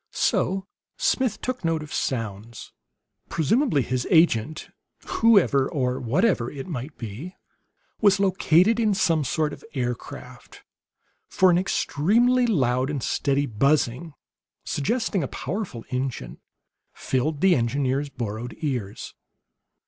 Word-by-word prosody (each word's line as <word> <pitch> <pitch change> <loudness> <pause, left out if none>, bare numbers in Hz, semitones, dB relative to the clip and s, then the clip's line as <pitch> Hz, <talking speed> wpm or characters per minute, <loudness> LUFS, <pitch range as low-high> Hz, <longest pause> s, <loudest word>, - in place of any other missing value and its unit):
So 190 +1 0 0.3
Smith 260 - 0
took 255 -3 -4
note 165 -2 0
of 150 - -10
sounds. 115 -2 -4 0.6
Presumably 170 - +1
his 125 0 -2
agent 155 -3 +2 0.4
whoever 195 -12 +3
or 125 -3 -1
whatever 130 - +1
it 135 -2 -7
might 145 -2 -6
be 120 - -7 0.7
was 200 -3 +4
located 190 +2 +3
in 215 -3 +2
some 165 -5 +2
sort 150 +2 -1
of - - -11
aircraft; 125 -2 -6 0.7
for 185 -1 +4
an 175 - +3
extremely 230 - +2
loud 130 - +1
and 140 -4 -3
steady 140 0 0
buzzing, 140 +5 0 0.5
suggesting 200 - -1
a 140 - -2
powerful 180 - -5
engine, 125 - -4 0.5
filled 140 +3 -2
the 190 -2 +5
engineer's 135 +3 0
borrowed 120 -2 -5
ears. 125 -10 -4
145 Hz, 115 wpm, -24 LUFS, 125-190 Hz, 0.7 s, the